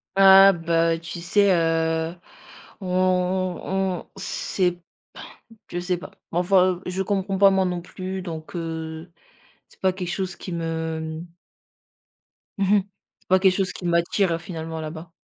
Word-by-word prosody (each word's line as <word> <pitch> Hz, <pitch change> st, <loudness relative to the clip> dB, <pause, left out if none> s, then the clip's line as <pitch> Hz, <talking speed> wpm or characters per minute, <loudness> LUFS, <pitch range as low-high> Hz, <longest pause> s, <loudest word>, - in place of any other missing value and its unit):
Ah 195 Hz, 0 st, +8 dB
bah, 165 Hz, 0 st, +1 dB
tu 170 Hz, +1 st, -7 dB
sais, 200 Hz, +3 st, +3 dB
heu, 165 Hz, 0 st, 0 dB, 0.7 s
on 185 Hz, -, -5 dB, 0.8 s
on 190 Hz, -2 st, -2 dB
on -, -, -11 dB
sait 180 Hz, -2 st, -1 dB, 0.9 s
je 175 Hz, -, -2 dB
sais 180 Hz, 0 st, -1 dB
pas. 175 Hz, -, -10 dB, 0.2 s
Mais 170 Hz, -, +1 dB
enfin, 185 Hz, 0 st, +3 dB
je 185 Hz, +1 st, -2 dB
comprends 195 Hz, 0 st, -1 dB
pas 195 Hz, 0 st, +6 dB
moi 190 Hz, -1 st, +2 dB
non 180 Hz, -1 st, -2 dB
plus, 185 Hz, +2 st, -6 dB
donc, 165 Hz, -2 st, -7 dB
heu, 160 Hz, 0 st, -5 dB, 0.6 s
c'est -, -, -24 dB
pas 190 Hz, -, +3 dB
quelque 180 Hz, -2 st, -5 dB
chose 185 Hz, +1 st, -3 dB
qui 185 Hz, -, -8 dB
me 160 Hz, -1 st, -3 dB, 1.3 s
mmh 195 Hz, +1 st, +3 dB
mh. -, -, +2 dB, 0.4 s
C'est -, -, -34 dB
pas 185 Hz, -, +5 dB
quelque 190 Hz, -1 st, +4 dB
chose 190 Hz, -2 st, 0 dB
qui 180 Hz, -, -8 dB
m'attire 170 Hz, 0 st, +1 dB
finalement 160 Hz, -2 st, -6 dB
là-bas. 160 Hz, +2 st, -7 dB
175 Hz, 150 wpm, -24 LUFS, 165-190 Hz, 1.3 s, Ah